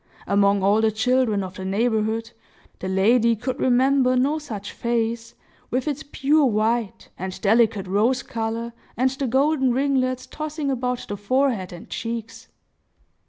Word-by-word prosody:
Among 200 Hz, -1 st, +2 dB
all 205 Hz, +3 st, +4 dB
the 220 Hz, -, +3 dB
children 220 Hz, -2 st, +1 dB
of 185 Hz, -1 st, -7 dB
the 190 Hz, -, -6 dB
neighborhood, 220 Hz, +2 st, 0 dB, 0.5 s
the 185 Hz, -, -4 dB
lady 225 Hz, +5 st, +3 dB
could 250 Hz, +4 st, -4 dB
remember 255 Hz, +1 st, +3 dB
no 280 Hz, +5 st, +1 dB
such 220 Hz, -10 st, -7 dB
face, 230 Hz, 0 st, -2 dB, 0.3 s
with 255 Hz, +4 st, -1 dB
its 290 Hz, -1 st, -2 dB
pure 295 Hz, +1 st, +1 dB
white, 220 Hz, -1 st, -1 dB
and 185 Hz, +1 st, -5 dB
delicate 220 Hz, -1 st, +3 dB
rose 225 Hz, +7 st, +1 dB
color, 230 Hz, +1 st, -4 dB, 0.2 s
and 255 Hz, +2 st, +2 dB
the 270 Hz, 0 st, -3 dB
golden 265 Hz, 0 st, +2 dB
ringlets 255 Hz, -1 st, 0 dB
tossing 305 Hz, -2 st, -4 dB
about 250 Hz, -1 st, -2 dB
the 205 Hz, -, -4 dB
forehead 225 Hz, -2 st, 0 dB
and 175 Hz, -, -10 dB
cheeks. 230 Hz, -1 st, -6 dB
235 Hz, 145 wpm, -23 LUFS, 215-260 Hz, 0.5 s, all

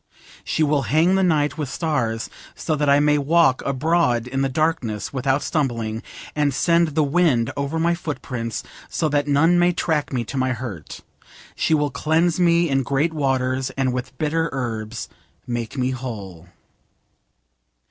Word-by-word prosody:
She 160 Hz, -, 0 dB
will 150 Hz, -1 st, +2 dB
hang 165 Hz, +5 st, +4 dB
the 190 Hz, -, +3 dB
night 155 Hz, -4 st, +1 dB
with 145 Hz, -4 st, -2 dB
stars 125 Hz, -10 st, -1 dB, 0.3 s
so 155 Hz, -, -1 dB
that 150 Hz, -1 st, 0 dB
I 140 Hz, +1 st, +6 dB
may 150 Hz, 0 st, +3 dB
walk 145 Hz, -2 st, +3 dB
abroad 140 Hz, -3 st, +1 dB
in 135 Hz, +2 st, -2 dB
the 135 Hz, -, +1 dB
darkness 130 Hz, -8 st, -1 dB
without 135 Hz, +1 st, 0 dB
stumbling, 115 Hz, -7 st, -1 dB, 0.3 s
and 145 Hz, -3 st, +1 dB
send 170 Hz, -2 st, +2 dB
the 155 Hz, -, +3 dB
wind 140 Hz, -5 st, +2 dB
over 140 Hz, +3 st, -2 dB
my 170 Hz, +1 st, +2 dB
footprints 130 Hz, -8 st, -4 dB, 0.3 s
so 160 Hz, -, 0 dB
that 145 Hz, 0 st, 0 dB
none 160 Hz, +5 st, +4 dB
may 175 Hz, 0 st, +3 dB
track 160 Hz, -3 st, -1 dB
me 125 Hz, -3 st, -1 dB
to 125 Hz, +5 st, -6 dB
my 130 Hz, 0 st, +1 dB
hurt: 110 Hz, -, -7 dB, 0.5 s
she 160 Hz, -, +2 dB
will 145 Hz, -1 st, 0 dB
cleanse 160 Hz, +5 st, +1 dB
me 170 Hz, -1 st, +4 dB
in 135 Hz, -2 st, +1 dB
great 140 Hz, +5 st, 0 dB
waters, 130 Hz, -3 st, 0 dB
and 130 Hz, -2 st, +1 dB
with 125 Hz, +1 st, -5 dB
bitter 160 Hz, +2 st, 0 dB
herbs 115 Hz, -3 st, -4 dB, 0.4 s
make 120 Hz, +1 st, -4 dB
me 130 Hz, 0 st, 0 dB
whole. 100 Hz, -9 st, -7 dB
140 Hz, 160 wpm, -22 LUFS, 125-160 Hz, 0.5 s, I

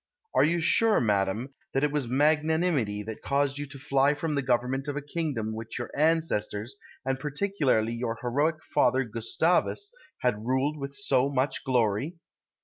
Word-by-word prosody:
Are -, -, +5 dB
you 170 Hz, +3 st, +2 dB
sure, 215 Hz, +7 st, +4 dB
madam, 105 Hz, +4 st, 0 dB, 0.2 s
it 140 Hz, +2 st, +2 dB
was 145 Hz, -4 st, -1 dB
magnanimity 150 Hz, -5 st, +1 dB
that 110 Hz, +1 st, -7 dB
caused 140 Hz, 0 st, 0 dB
you 145 Hz, -, -4 dB
to 140 Hz, 0 st, -10 dB
fly 140 Hz, +2 st, +2 dB
from 155 Hz, +1 st, -2 dB
the 140 Hz, -, +1 dB
government 130 Hz, +2 st, 0 dB
of 145 Hz, 0 st, -3 dB
a -, -, -2 dB
kingdom 145 Hz, -8 st, -3 dB
which 110 Hz, 0 st, -6 dB
your 120 Hz, -, -5 dB
ancestors, 135 Hz, -7 st, 0 dB, 0.3 s
and 135 Hz, 0 st, -1 dB
particularly 145 Hz, -, 0 dB
your 115 Hz, -1 st, -3 dB
heroic 145 Hz, +6 st, 0 dB
father 130 Hz, -1 st, +2 dB
Gustavus, 160 Hz, -, 0 dB, 0.3 s
had 110 Hz, -4 st, 0 dB
ruled 130 Hz, +5 st, 0 dB
with 140 Hz, 0 st, -5 dB
so 135 Hz, -1 st, +2 dB
much 135 Hz, 0 st, -1 dB
glory? 125 Hz, -, +1 dB
135 Hz, 155 wpm, -28 LUFS, 120-150 Hz, 0.3 s, Are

